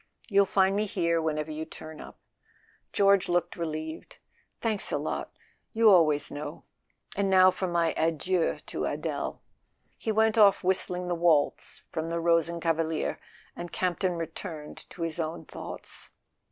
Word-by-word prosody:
You'll 200 -1 +4
find 195 0 +3
me 210 +1 0
here 170 -3 +1
whenever 155 -1 -2
you 155 +1 -4
turn 155 0 -10
up." - - -11 0.7
George 200 -2 +4
looked 175 0 0
relieved. 160 -1 -5 0.4
"Thanks 220 -3 -2
a - - +1
lot—you 225 -2 0
always 155 -5 +4
know. 150 +2 -6 0.5
And 200 -1 +1
now 185 -1 +7
for 185 - -2
my 170 -1 +1
adieux 165 +2 +1
to - - -3
Adele." - - -3 0.6
He 220 - -1
went 220 +1 +3
off 200 -2 +6
whistling 180 -1 +1
the 175 - 0
waltz 165 -4 +1
from 160 0 -3
the 170 0 -1
Rosen 170 0 +2
kavalier, 165 -1 -1 0.4
and 175 - -7
Campton 185 0 0
returned 160 -1 -7
to 170 - -6
his 165 0 -2
own 160 0 -3
thoughts. - - -8
170 Hz, 145 wpm, -28 LUFS, 160-190 Hz, 0.7 s, now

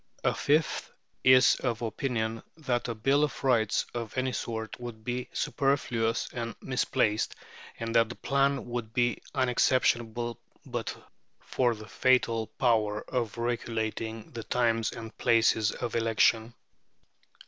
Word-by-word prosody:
A - - +3
fifth 150 +2 +1 0.3
is 130 +3 +6
of 120 -2 -2
opinion 115 -1 -2 0.2
that 130 -7 -1
a 115 - -3
bill 135 +7 +2
of 150 - -2
rights 115 -5 +2
of 115 0 -5
any 130 0 +1
sort 110 -2 -4
would 115 -3 -7
be 125 +2 -3
superfluous 120 -5 0
and 115 -2 -4
misplaced, 125 -4 0 0.4
and 115 0 -3
that 115 -1 +4
the 120 - -6
plan 140 0 +1
would 120 -2 -5
be 120 -1 +1
unexceptionable 120 -2 +1 0.2
but - - -4 0.4
for 120 -2 0
the 110 0 -11
fatal 115 -3 +2
power 110 -4 +1
of 120 -3 -2
regulating 115 -2 -3
the 115 - -6
times 115 -2 +1
and 115 -1 -8
places 110 -2 +3
of 120 -3 -4
election. 115 0 +2
120 Hz, 130 wpm, -29 LUFS, 110-125 Hz, 0.4 s, is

